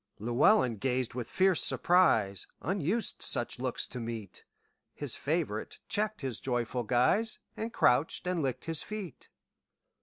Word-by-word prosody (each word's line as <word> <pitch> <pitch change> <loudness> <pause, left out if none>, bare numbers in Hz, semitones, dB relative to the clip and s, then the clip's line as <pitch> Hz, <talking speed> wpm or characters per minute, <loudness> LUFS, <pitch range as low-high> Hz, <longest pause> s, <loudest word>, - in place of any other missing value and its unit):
Llewelyn 120 - +3
gazed 125 +2 -1
with 120 -1 -5
fierce 190 -2 +3
surprise; 110 - +3 0.2
Unused 190 +5 -1
such - - -1
looks - - -2
to 125 - -7
meet, 115 -4 -6 0.5
His 145 -5 -2
favorite 145 -8 -2
checked 215 -1 -1
his 130 -5 -2
joyful 120 -1 -1
guise, 125 - +2 0.2
And 225 +1 -4
crouched 140 - +2
and 180 -2 0
licked 130 -3 -2
his 165 -2 -1
feet. 205 - -7
135 Hz, 130 wpm, -31 LUFS, 120-185 Hz, 0.5 s, Llewelyn